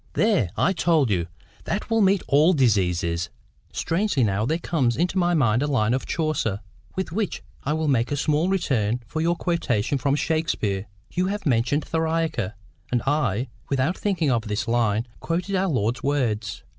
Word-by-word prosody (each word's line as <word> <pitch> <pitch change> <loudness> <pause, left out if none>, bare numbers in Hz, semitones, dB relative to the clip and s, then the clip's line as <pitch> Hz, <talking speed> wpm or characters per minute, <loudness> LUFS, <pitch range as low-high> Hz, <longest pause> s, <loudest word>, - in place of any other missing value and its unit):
'" - - -32
"There! 205 - +2
I 190 - +3
told 160 - +2
you! 85 -4 0 0.4
That 210 +2 -3
will 225 0 +3
meet 195 -1 +3
all 150 +6 +5
diseases." 90 - +1 0.4
"Strangely 165 - 0
now, 105 +1 +1
there 160 - +1
comes 140 -9 0
into 180 +3 +1
my 175 -1 +2
mind 120 -5 +3
a 145 - +1
line 120 -5 +2
of 130 - -2
Chaucer, 150 - -1 0.3
with 190 -3 -3
which 205 +2 -2 0.2
I 150 - +1
will 160 0 -1
make 130 -2 +1
a 145 - 0
small 155 +5 +1
return 125 - 0
for 155 - -3
your 170 +1 +2
quotation 140 -8 0
from 140 +2 +1
Shakespeare; 130 -12 -1 0.2
you 180 +1 0
have 205 +1 -3
mentioned 135 +3 +1
theriaca; 160 - -1 0.4
and 120 -1 +1
I, 135 -5 0 0.2
without 140 +6 +1
thinking 180 -9 0
of 115 -2 0
this 105 +1 -2
line, 115 -1 +1
quoted 175 +4 -2
our 190 +1 +1
Lord's 120 -4 0
words. 115 -7 -1
145 Hz, 175 wpm, -24 LUFS, 115-165 Hz, 0.4 s, all